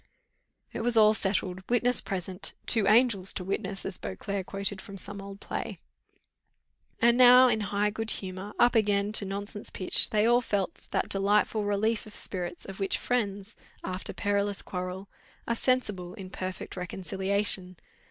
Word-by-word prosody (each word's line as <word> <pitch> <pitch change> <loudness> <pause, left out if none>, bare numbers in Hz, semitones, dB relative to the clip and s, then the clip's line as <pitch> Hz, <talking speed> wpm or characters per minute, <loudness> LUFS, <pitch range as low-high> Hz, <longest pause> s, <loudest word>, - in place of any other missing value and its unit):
It - - -3
was 235 0 +1
all 215 -1 +7
settled, 190 -3 -1
witness 245 0 +2
present 185 0 -4
"two 220 -4 +4
angels 215 -3 +3
to 185 - -3
witness," 195 +1 -3
as 190 -1 -4
Beauclerc 185 - -4
quoted 195 0 -2
from 200 -3 -10
some 200 +1 -8
old 195 0 -9
play. - - -5 1.2
And 235 +1 +4
now 250 +1 +9
in 220 -3 +2
high 205 0 0
good 225 +1 -4
humour, 190 +1 -5
up 240 - +5
again 205 -2 +2
to 215 -1 +2
nonsense 200 +1 -5
pitch, 185 - +3
they 210 0 +2
all 240 +1 +4
felt 205 -5 -3
that - - 0
delightful 205 +2 +2
relief 215 +2 0
of 210 - -8
spirits, 175 -2 -3
of 195 0 -9
which 195 -1 0
friends, 205 -4 -2 0.3
after 185 0 -4
perilous 205 -1 -1
quarrel, 185 +1 -5 0.4
are 235 - +1
sensible 210 -8 -1
in 190 -4 -9
perfect 185 -1 -6
reconciliation. 190 0 -1
200 Hz, 155 wpm, -28 LUFS, 190-220 Hz, 1.2 s, now